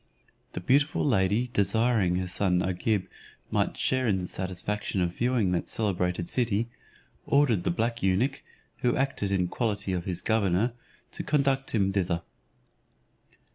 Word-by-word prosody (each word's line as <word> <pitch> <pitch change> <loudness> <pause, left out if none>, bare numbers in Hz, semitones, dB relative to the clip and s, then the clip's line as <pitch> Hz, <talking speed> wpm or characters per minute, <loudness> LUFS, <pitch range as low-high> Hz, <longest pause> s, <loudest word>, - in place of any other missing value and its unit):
The - - -3
beautiful 140 - +2
lady 110 0 +2
desiring 105 -2 +2
her 90 0 -1
son 90 0 +1
Agib 95 +2 0 0.5
might - - 0
share 130 -1 +1
in 100 -3 +2
the 90 -1 -4
satisfaction 95 +3 -2
of 90 -1 0
viewing 120 -5 +1
that 90 - -1
celebrated 90 -4 -1
city, 115 -2 0 0.6
ordered 130 -10 +3
the - - +2
black 115 +6 -1
eunuch, 105 +9 +1 0.4
who 120 -1 +1
acted 135 -7 0
in 95 -2 +1
quality 100 -2 -1
of 90 -1 -2
his 90 -1 -3
governor, 110 +1 +1 0.4
to - - -5
conduct 135 -2 +1
him 95 -3 +2
thither. 90 -3 -1
100 Hz, 140 wpm, -27 LUFS, 90-120 Hz, 0.6 s, ordered